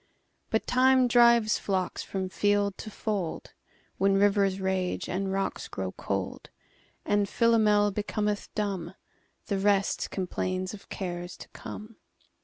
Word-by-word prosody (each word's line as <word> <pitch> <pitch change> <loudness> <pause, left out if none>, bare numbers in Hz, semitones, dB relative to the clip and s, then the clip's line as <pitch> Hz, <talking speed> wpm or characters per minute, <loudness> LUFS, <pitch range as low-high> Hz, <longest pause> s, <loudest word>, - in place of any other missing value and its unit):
But 220 - 0
Time 255 0 +4
drives 235 -2 +5
flocks 190 -2 -1
from 190 -1 -3
field 205 +1 +1
to - - -6
fold; 205 -5 -3 0.5
When 195 +1 +3
rivers 195 -1 +3
rage 190 -1 -1
and 190 +1 -2
rocks 195 0 -2
grow 95 -2 -4
cold; 95 -1 -4 0.6
And 205 -1 +1
Philomel 215 -3 +4
becometh 210 0 -2
dumb; 195 -4 -2 0.5
The 200 - -1
rest 200 0 +1
complains 185 0 -2
of 205 - -12
cares 175 -2 -5
to - - -11
come. 215 +1 -9
200 Hz, 125 wpm, -28 LUFS, 185-210 Hz, 0.6 s, drives